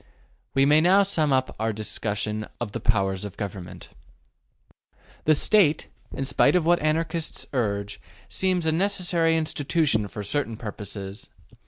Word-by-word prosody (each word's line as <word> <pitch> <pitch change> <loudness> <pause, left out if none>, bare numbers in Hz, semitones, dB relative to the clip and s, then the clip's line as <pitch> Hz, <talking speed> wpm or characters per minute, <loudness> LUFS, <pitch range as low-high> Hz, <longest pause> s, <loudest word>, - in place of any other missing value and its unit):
We 135 0 +4
may 150 +2 +5
now 190 +4 +5
sum 160 -7 +1
up 130 -1 +1
our 110 0 0
discussion 105 0 -3
of 120 -4 -4
the - - -4
powers 95 -3 0
of 105 -2 -7
Government. 95 -4 -7 1.4
The 155 - +5
State, 160 -2 +3 0.2
in 135 - -4
spite 140 +5 +3
of 175 -3 +2
what 175 +1 +4
Anarchists 160 +1 -1
urge, 105 -4 -2 0.3
seems 185 -3 0
a 160 - +3
necessary 175 -2 +1
institution 150 -7 0
for 105 +1 -7
certain 115 +1 -2
purposes. 100 -2 -7
135 Hz, 140 wpm, -25 LUFS, 105-165 Hz, 1.4 s, may